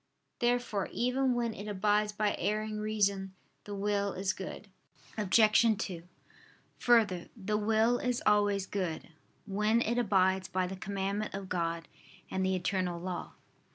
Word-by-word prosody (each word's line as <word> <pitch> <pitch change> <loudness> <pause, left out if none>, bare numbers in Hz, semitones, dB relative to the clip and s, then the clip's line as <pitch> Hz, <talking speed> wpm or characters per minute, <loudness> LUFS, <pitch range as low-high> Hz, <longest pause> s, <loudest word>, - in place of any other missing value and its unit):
Therefore 240 -5 0
even 250 +1 +1
when 235 -2 0
it 205 +1 -8
abides 210 +1 +1
by 210 0 0
erring 215 0 -1
reason, 200 -3 0 0.3
the 205 - -5
will 200 0 0
is 190 0 -1
good. 195 +2 -7 0.5
Obj. 215 +1 +4
2: 175 -3 -5 0.7
Further, 215 -8 +3
the 210 0 -2
will 225 +3 +2
is 250 -1 -1
always 205 -2 +3
good, 185 -6 -3 0.4
when 210 +3 +2
it 235 +1 +1
abides 190 -4 +2
by 185 0 0
the 185 +1 -5
commandment 200 +2 -3
of 195 -1 -6
God 170 -2 -2 0.4
and 190 - 0
the 190 0 +1
eternal 185 -1 -1
law. 180 0 -5
205 Hz, 140 wpm, -31 LUFS, 190-215 Hz, 0.7 s, Obj